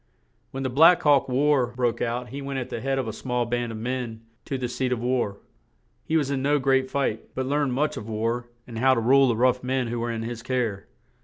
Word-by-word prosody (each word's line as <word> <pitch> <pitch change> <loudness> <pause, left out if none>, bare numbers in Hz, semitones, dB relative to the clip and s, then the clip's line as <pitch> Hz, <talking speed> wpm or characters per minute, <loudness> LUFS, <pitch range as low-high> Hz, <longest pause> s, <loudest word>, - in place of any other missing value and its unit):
When 135 0 -5
the 130 - -1
"Black 165 +7 +6
Hawk 145 -3 +4
War" 135 0 +3
broke 120 -1 -1
out 120 +1 -2
he 140 +4 -6
went 140 0 -4
at 130 -1 -4
the 115 - -5
head 135 0 -1
of 130 -3 -2
a 110 - -4
small 125 +1 -2
band 120 0 -2
of 110 - -6
men 120 -1 -4 0.2
to 135 - -3
the 125 -1 -2
seat 125 +1 -2
of 125 - 0
war; 120 -4 -1 0.7
he 160 - +1
was 140 -3 0
in 135 -1 -1
no 145 +2 +2
great 135 -1 +2
fight, 130 -6 -2
but 130 - -1
learned 140 -1 0
much 150 +4 0
of 105 - -7
war 115 +2 -2 0.2
and 115 -2 -7
how 130 +1 +4
to - - +1
rule 135 +4 +5
the 120 - +1
rough 125 +1 +2
men 130 -1 -1
who 120 0 -3
were 120 +1 -2
in 115 -1 -4
his 115 0 -5
care. 115 -6 -2
125 Hz, 245 wpm, -25 LUFS, 120-135 Hz, 0.7 s, Black